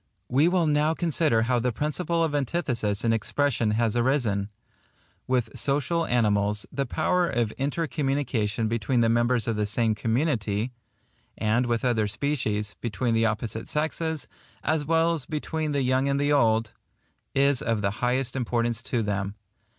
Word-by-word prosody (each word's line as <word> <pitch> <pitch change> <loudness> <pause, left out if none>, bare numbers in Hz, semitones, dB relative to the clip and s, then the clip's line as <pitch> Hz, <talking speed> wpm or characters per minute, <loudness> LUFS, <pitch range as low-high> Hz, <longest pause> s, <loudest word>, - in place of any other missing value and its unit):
We 140 +6 +4
will 175 -1 +2
now 150 +1 +2
consider 155 -9 +2
how 120 +1 +1
the 125 +1 0
principle 165 +6 -1
of 160 -2 0
antithesis 125 - -1
in 115 - +3
expression 115 +1 0
has 115 -2 +1
arisen. 120 -5 +1 0.8
With 125 -4 0
social 150 +4 0
animals, 105 -3 +2
the 140 -2 -2
power 180 +6 +1
of 120 -4 0
intercommunication 135 -6 -1
between 115 +2 0
the 115 - +3
members 120 0 +2
of 115 -2 0
the 105 -1 0
same 110 +1 +2
community,—and 115 -1 -2
with 120 +1 0
other 110 -4 +2
species, 105 -4 -2
between 115 +1 -1
the 115 0 +3
opposite 110 0 -3
sexes, 160 0 -2 0.4
as 155 -2 0
well 165 +2 +3
as 155 -5 -4
between 155 0 -2
the 140 -2 0
young 130 +2 +2
and 140 0 +1
the 145 +1 +2
old,—is 120 +3 0
of 115 -3 -1
the 100 - +1
highest 125 +1 0
importance 120 -2 -1
to 120 -3 -1
them. 100 -1 -2
125 Hz, 150 wpm, -26 LUFS, 110-145 Hz, 0.8 s, We